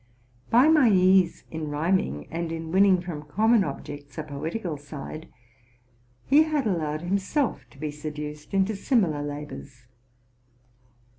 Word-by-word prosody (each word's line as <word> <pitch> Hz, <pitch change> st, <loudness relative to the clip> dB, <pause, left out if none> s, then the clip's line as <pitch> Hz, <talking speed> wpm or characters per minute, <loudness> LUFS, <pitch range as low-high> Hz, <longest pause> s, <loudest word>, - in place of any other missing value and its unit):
By 245 Hz, +5 st, +6 dB
my 305 Hz, -6 st, +6 dB
ease 185 Hz, -2 st, +4 dB
in 160 Hz, -1 st, -4 dB
rhyming, 145 Hz, -, 0 dB
and 165 Hz, 0 st, -3 dB
in 165 Hz, 0 st, -5 dB
winning 190 Hz, 0 st, +5 dB
from 170 Hz, -4 st, -6 dB
common 215 Hz, +9 st, +3 dB
objects 145 Hz, -1 st, -7 dB
a 155 Hz, -, -3 dB
poetical 160 Hz, +5 st, -4 dB
side, 145 Hz, +2 st, -9 dB, 0.9 s
he 285 Hz, +3 st, +6 dB
had 310 Hz, -4 st, +1 dB
allowed 155 Hz, -6 st, -1 dB
himself 195 Hz, -, -1 dB
to 120 Hz, -, -20 dB
be 150 Hz, +1 st, -4 dB
seduced 150 Hz, 0 st, -7 dB
into 195 Hz, +2 st, +1 dB
similar 195 Hz, -, +1 dB
labors. 145 Hz, -3 st, -7 dB
165 Hz, 130 wpm, -26 LUFS, 150-195 Hz, 0.9 s, By